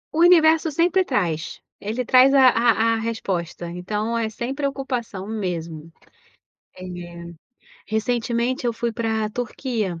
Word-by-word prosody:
O - - 0
universo 325 -2 +5
sempre 350 +5 +2
traz. 170 - -2 0.2
Ele 225 +5 -3
traz 260 +2 +6
a 265 -2 +7
a 230 -1 +3
a - - +1
resposta. 190 -7 -3
Então, 210 +6 -3
é 225 -1 -1
sem 235 +4 -4
preocupação 270 -8 -3
mesmo. 170 -7 -5 0.9
É. 185 - -8 1.0
Recentemente 235 +3 -1
eu 240 - +1
fui 235 +1 -3
pra 220 -2 -1
Turquia. 220 -5 -3
230 Hz, 125 wpm, -22 LUFS, 205-255 Hz, 1.0 s, a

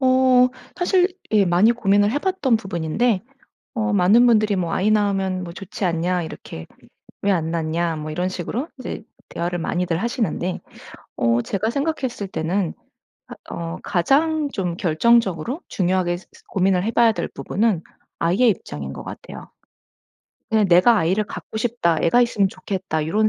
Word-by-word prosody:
어 255 -1 +5 0.3
사실 360 0 +3 0.2
예 210 -2 +5
많이 180 +6 +4
고민을 205 -3 +2
해봤던 290 -4 +1
부분인데 195 +2 -1 0.5
어 225 -1 0
많은 205 +5 +5
분들이 215 -3 +3
뭐 175 -3 -2
"아이 205 +3 +1
낳으면 195 -3 +1
뭐 170 - -8
좋지 195 +2 -6
않냐." 175 +1 0
이렇게 80 - -8 0.6
"왜 200 - +2
안 165 -4 0
낳냐." 165 0 -1
뭐 155 0 -5
이런 180 +4 -1
식으로 215 - -4
이제 240 - -6 0.3
대화를 175 +1 -3
많이들 175 0 -1
하시는데 225 -6 -2 0.6
어 115 0 +2
제가 205 - -2
생각했을 275 -6 -2
때는 175 +1 -1 0.5
아 - - -9 0.2
어 85 0 -5
가장 295 - +1
좀 180 -8 -3
결정적으로 200 - +2
중요하게 180 -1 0
스스 185 - -20
고민을 185 -1 +1
해 225 - 0
봐야 230 -1 +4
될 - - -3
부분은 205 -3 -1 0.4
아이의 190 +9 +3
입장인 75 - -5
것 - - -8
같아요. - - -10 1.0
그냥 220 -2 +3
'내가 180 +7 +6
아이를 185 +4 +1
갖고 210 - -8
싶다. 220 -8 +1
애가 240 +9 +4
있으면 210 -5 +2
좋겠다.' 185 -5 -3
요런 215 +6 +2
195 Hz, 320 characters per minute, -22 LUFS, 175-235 Hz, 1.0 s, 내가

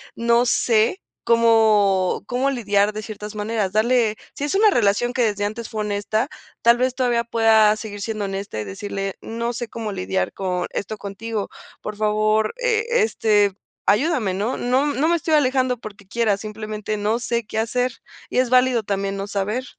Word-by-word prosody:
no 235 +1 +2
sé 230 - +2 0.2
como 220 -6 +3
como 250 +5 0
lidiar 205 -5 +1
de 215 - -5
ciertas 210 0 -8
maneras". 210 -2 -1
Darle 225 0 +2 0.2
si - - -6
es 290 +5 -1
una 425 +2 +6
relación 235 - +2
que 255 - 0
desde 205 -2 0
antes 220 +2 -5
fue 215 - -3
honesta, 210 +4 -1 0.3
tal 235 +1 +6
vez 255 +1 +1
todavía 245 -2 +1
pueda 225 -2 +4
seguir 210 -2 -7
siendo 215 -1 -3
honesta 195 - -4
y - - -2
decirle: 195 - -5
"No 235 +1 -3
sé 240 0 -4
cómo 225 -1 -5
lidiar 190 0 -2
con 180 -2 -2
esto 215 +2 -4
contigo, 205 +2 -5 0.3
por 210 - -5
favor, 215 +1 +1
e 475 -3 +1 0.2
este, 210 - +2 0.3
ayúdame", 240 - +2
¿no? 210 +7 -2
No 255 +3 +1
no 290 +1 +1
me 340 - +3
estoy 320 -1 +1
alejando 260 -3 +2
porque 200 -3 -11
quiera, 220 -1 +1
simplemente 215 0 -5
no 210 +2 0
sé 235 -1 -2
qué 220 - -3
hacer 245 +3 0 0.4
y - - -3
es 255 -1 +2
válido 250 -1 +4
también 195 -1 -2
no 195 0 -4
saber. 205 +5 -2
220 Hz, 175 wpm, -22 LUFS, 205-240 Hz, 0.4 s, una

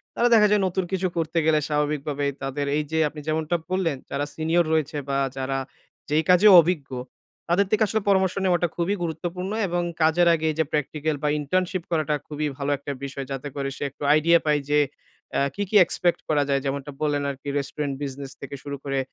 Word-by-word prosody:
তারা 240 - +3
দেখা 210 -2 +7
যায় 210 -1 +4
নতুন 185 +1 -1
কিছু 190 0 0
করতে 165 +1 -1
গেলে 155 -1 +4
স্বাভাবিকভাবে 150 -1 -1 0.2
তাদের 140 +1 -2
এইযে 155 +2 -1
আপনি 150 - -10
যেমনটা 155 +2 0 0.2
বললেন, 170 -7 0
যারা 145 +1 -2
সিনিয়র 165 +2 +2
রয়েছে 155 -1 0
বা 135 - +1 0.2
যারা 135 0 -2 0.5
যেই 155 +2 +2
কাজে 180 +4 +7
অভিজ্ঞ 160 -5 -2 0.6
তাদের 190 +3 +3
থেকে 215 0 +3
আসলে 220 0 0
পরামর্শ 190 -2 +3
নেওয়াটা 175 -1 +2
খুবই 180 +4 0
গুরুত্বপূর্ণ 175 +4 -4 0.2
এবং 175 0 0 0.2
কাজ 160 +1 +4 0.2
আগে 160 -1 -1
এইযে 160 0 0
প্র্যাকটিক্যাল 150 +1 -1
বা 150 - +2
ইন্টার্নশিপ 180 +4 -1
করাটা 155 -2 +1
খুবই 150 0 -2
ভালো 140 0 -1
একটা 140 +1 -6
বিষয়। 135 0 -5
যাতে 135 +1 -4
করে 135 -1 -2
সে - - -4
একটু 145 - -11
আইডিয়া 165 +2 +5
পায় 150 -1 +3
যে 150 - +5 0.6
আ - - +2
কি, 205 - -1
কি 215 - -3
এক্সপেক্ট 175 +1 +1
করা 145 -2 +3
যায়। 140 -1 +2
যেমনটা 140 +1 -3
বললেন 145 -1 0
আরকি 140 +1 -6
রেস্টুরেন্ট 140 0 -3
বিজনেস 135 -1 -6
থেকে 140 0 -6
শুরু 140 -1 -5
করে 135 -1 -1
155 Hz, 190 wpm, -24 LUFS, 145-175 Hz, 0.6 s, দেখা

